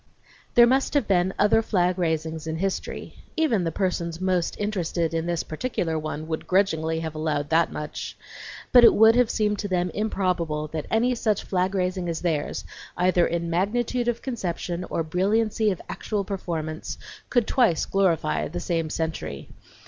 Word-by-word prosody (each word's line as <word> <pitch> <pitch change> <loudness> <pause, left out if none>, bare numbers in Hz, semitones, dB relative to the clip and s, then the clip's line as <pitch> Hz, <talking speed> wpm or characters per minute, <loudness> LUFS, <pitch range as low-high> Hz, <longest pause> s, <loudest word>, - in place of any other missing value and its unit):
There 240 - +9
must 265 +4 +1
have 285 -7 +2
been 185 -1 +2
other 210 +2 +4
flag 180 -4 +1
raisings 160 -1 -1
in 160 - -2
history, 195 +2 -4 0.2
even 260 - +2
the 165 - 0
persons 170 -2 -2
most 185 -2 0
interested 175 -5 -1
in 165 +1 -1
this 170 -1 -1
particular 165 -4 -2
one 155 0 -5
would 160 -1 -4
grudgingly 160 -4 +1
have 160 -1 -4
allowed 155 -2 -2
that 165 +1 +3
much, 150 0 -6 0.5
but 245 -1 +8
it - - +8
would 220 +1 +7
have 245 -2 +4
seemed 210 -1 0
to 205 - -2
them 180 -2 0
improbable 180 -7 -1
that 155 -1 -4
any 240 +3 +2
such 220 -4 0
flag 185 +1 0
raising 180 -1 -1
as 165 - -3
theirs, 160 -4 -1 0.3
either 180 -1 +3
in 170 0 -2
magnitude 235 +7 0
of 235 -1 -1
conception 180 -8 -3
or 165 - -1
brilliancy 210 +6 +1
of 185 - -2
actual 210 -2 -3
performance, 165 -5 -4 0.3
could 245 -3 +2
twice 225 - +2
glorify 180 -6 +1
the 175 +3 -5
same 165 -2 -1
century. 160 - -4
180 Hz, 165 wpm, -25 LUFS, 160-210 Hz, 0.5 s, There